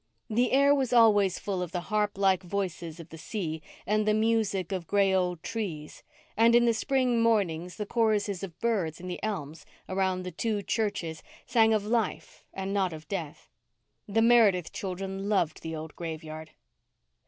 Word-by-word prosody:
The 240 +3 +2
air 280 +2 +5
was 270 -4 0
always 205 -5 +5
full 195 -3 -3
of 175 -2 -4
the 180 - 0
harp 210 -2 +1
like 190 -2 +3
voices 175 -3 -4
of 165 - -10
the 160 - -10
sea, 160 -2 -4 0.2
and 215 +1 +1
the 215 - +4
music 215 -5 +1
of 180 -4 -3
gray 200 -1 +3
old 180 -3 0
trees, 170 -10 -5 0.3
and 230 +2 +5
in 240 0 +5
the 235 - +4
spring 250 0 +1
mornings 180 -7 +1
the 210 - -4
choruses 210 -4 +1
of 180 -5 -8
birds 195 -9 -1
in 180 - -8
the 180 - -5
elms 165 -8 -4 0.2
around 185 -1 0
the 180 - -5
two 205 +4 -2
churches 200 -9 -2 0.2
sang 225 -2 +4
of 215 -2 +1
life 225 -2 -2
and 195 0 -4
not 190 -4 +1
of 155 0 -10
death. 165 -7 -5 0.6
The 225 +2 +2
Meredith 220 -7 +4
children 195 +1 -4
loved 175 -7 +1
the 160 0 -5
old 155 0 -7
graveyard. 160 -1 -6
195 Hz, 175 wpm, -28 LUFS, 175-220 Hz, 0.6 s, air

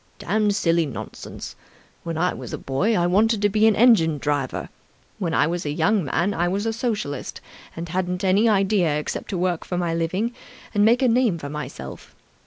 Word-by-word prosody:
"Damned 210 +1 +1
silly 165 -5 +2
nonsense! 135 - -8 0.5
When 165 -1 -4
I 180 +2 +1
was 125 -3 -8
a - - -2
boy, 185 +12 0
I 175 - +2
wanted 210 +5 +3
to 205 - +4
be 215 +2 +3
an 220 - +4
engine 200 -10 +5
driver. 145 -2 -2 0.5
When 170 -5 -1
I - - +4
was 175 +2 -2
a 145 - -3
young 200 +4 +1
man, 175 +8 0
I 175 -1 0
was 195 +4 -1
a 225 - 0
Socialist 215 - -3 0.4
and 165 +1 -5
hadn't 180 +2 -2
any 195 +4 +4
idea 195 -6 +2
except 150 - -4
to 190 - -2
work 175 -1 0
for 180 - -4
my 175 -2 0
living 185 +8 -1 0.4
and 205 -1 +3
make 235 +4 +4
a - - +5
name 235 -6 +2
for 145 -3 -7
myself. 150 +1 -8
180 Hz, 195 wpm, -23 LUFS, 165-215 Hz, 0.5 s, engine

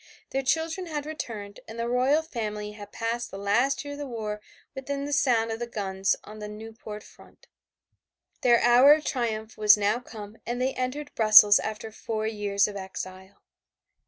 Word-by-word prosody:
Their 270 - 0
children 325 +6 -1
had 300 -3 -4
returned 215 -10 -6
and 225 - -9
the 230 0 -2
royal 260 +6 +2
family 210 -8 -5
had 210 -1 -11
passed 235 +1 -3
the 195 - -8
last 240 +9 +1
year 285 - -6
of 285 - -9
the 290 - -5
war 215 -4 -5 0.3
within 280 +1 -4
sound 235 -5 +2
of 225 - -4
the 240 - -4
guns 195 -3 -1
on 215 +1 -11
the 210 - -6
Nieuport 215 0 -9
front. - - -19 1.0
Their 240 -2 +5
hour 245 +4 +7
of 305 0 -1
triumph 220 -4 -3
was 210 0 +7
now 210 +3 +1
come 215 -3 -10
and 240 +1 -4
they 260 +1 0
entered 265 +4 -4
Brussels 215 -2 +8
after 220 0 -5
four 220 0 -4
years 205 -2 +1
of 205 - -7
exile. 190 0 -8
225 Hz, 175 wpm, -27 LUFS, 210-260 Hz, 1.0 s, Brussels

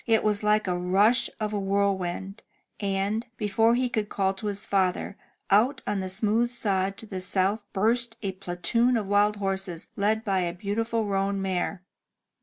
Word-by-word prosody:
It 225 -1 +3
was 210 -1 +1
like 210 0 +3
the 180 -2 -1
rush 195 +7 +3
of 215 -1 -2
a 205 - 0
whirlwind, 195 0 -1 0.4
and, 200 +2 -1
be 210 - -2
fore 225 +4 +3
he 250 +1 +1
could 215 -3 -2
call 195 -1 0
to 195 +2 -5
his 200 -1 -3
father, 190 0 0 0.4
out 225 +8 +4
on 205 -1 -1
the 190 0 -3
smooth 220 +5 +1
sod 195 -4 -1
to - - -8
the 190 -3 -5
south 195 +3 0
burst 225 +3 +1
a 195 - -1
platoon 190 +7 +1
of 215 - -2
wild 205 +1 +3
horses 195 -4 -3
led 215 +2 +1
by 195 -2 +1
a 175 -1 -1
beautiful 225 +4 -1
roan 195 0 0
mare. 185 -1 -2
200 Hz, 180 wpm, -26 LUFS, 190-215 Hz, 0.4 s, out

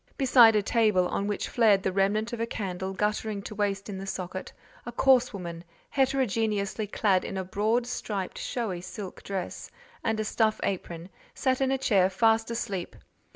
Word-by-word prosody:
Beside 245 -5 +7
a 210 - +3
table, 210 -5 +3
on 200 - -1
which 205 - -2
flared 210 -5 +3
the 190 - 0
remnant 205 +4 +1
of 235 - -4
a 230 - -1
candle 190 -3 -4
guttering 210 +1 -1
to - - -7
waste 200 -1 -1
in 195 -2 -5
the 195 - -7
socket, 185 0 -5 0.3
a 240 - -6
coarse 255 +1 +4
woman, 170 -5 -7 0.3
heterogeneously 225 -6 0
clad 195 -2 +2
in 195 - -5
a 190 - -2
broad 215 +6 0
striped 205 -6 -4
showy 210 -8 -3
silk 185 +1 -8
dress, 190 -3 -5 0.3
and 220 -1 0
a 215 - -1
stuff 220 0 +1
apron, 175 -3 -3 0.3
sat 260 -1 0
in 265 - +2
a 270 - +1
chair 200 -8 +3
fast 225 +3 +2
asleep. 200 -6 -4
210 Hz, 175 wpm, -28 LUFS, 190-230 Hz, 0.3 s, Beside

